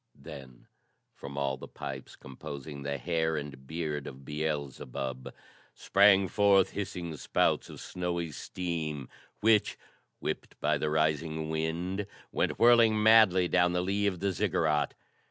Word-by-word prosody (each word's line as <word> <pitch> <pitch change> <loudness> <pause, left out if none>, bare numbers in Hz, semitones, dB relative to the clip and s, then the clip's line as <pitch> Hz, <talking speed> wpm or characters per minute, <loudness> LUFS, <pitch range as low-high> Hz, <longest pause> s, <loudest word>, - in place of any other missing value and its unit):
Then, 65 -3 -11 0.5
from 70 0 -9
all 70 -1 -1
the - - -9
pipes - - -7
composing 70 +2 -8
the 70 0 -3
hair 80 +2 0
and 70 -3 -7
beard 75 -2 -3
of 65 0 -10
Beelzebub, 70 -4 -4 0.4
sprang 100 -1 +5
forth 100 -1 +4
hissing 90 -5 -4
spouts - - +1
of - - -10
snowy 85 -2 -3
steam 80 -4 -4 0.3
which, 110 -1 +3 0.4
whipped - - -5
by - - +1
the 75 - 0
rising 80 +1 0
wind, 85 +5 -2 0.2
went - - 0
whirling 115 -3 +5
madly 110 -5 +6
down 90 0 +3
the 90 - +1
lee 100 +2 0
of 95 -3 -2
the 100 0 +1
Ziggurat. 80 -6 0
80 Hz, 135 wpm, -30 LUFS, 75-95 Hz, 0.5 s, madly